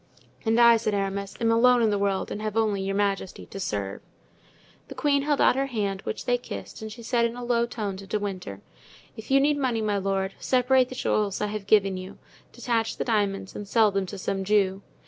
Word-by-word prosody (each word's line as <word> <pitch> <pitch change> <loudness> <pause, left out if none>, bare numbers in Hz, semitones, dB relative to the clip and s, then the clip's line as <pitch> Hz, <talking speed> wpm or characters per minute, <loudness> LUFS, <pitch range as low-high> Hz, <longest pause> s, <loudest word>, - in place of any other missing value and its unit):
"And 225 +1 +3
I," 235 -1 +7
said 215 -2 -1
Aramis, 195 0 -3
"I - - -4
am 230 - +3
alone 245 +1 +5
in 220 - +3
the 205 - 0
world 200 -1 -1
and 210 - -4
have 215 0 -3
only 210 -3 +1
your 195 +1 -2
majesty 200 -2 -1
to 195 - -9
serve." 100 - -3 0.9
The - - -9
queen 285 -1 +2
held 290 0 0
out - - +5
her 270 +1 0
hand, 200 -6 -2
which - - -5
they 245 0 +1
kissed, 100 - -8
and 220 0 -6
she 235 +2 -10
said 235 0 +1
in 235 0 0
a 245 - -7
low 235 -1 +1
tone 210 -5 -4
to 195 0 -10
De 210 - -1
Winter: 185 - -5 0.5
"If 220 - -10
you 270 0 +5
need 290 +1 +2
money, 250 -4 0
my 210 -2 0
lord, 195 0 -1
separate 255 0 +3
the 255 - -7
jewels 210 -5 0
I 210 - 0
have 210 -2 -5
given 195 -3 +3
you; 185 +1 -8 0.3
detach 225 -2 -1
the - - -2
diamonds 200 -4 -1
and 205 - -6
sell 215 0 +4
them 195 -1 -1
to 200 - -7
some 195 0 -2
Jew. 195 -1 +2
210 Hz, 230 wpm, -26 LUFS, 195-235 Hz, 0.9 s, I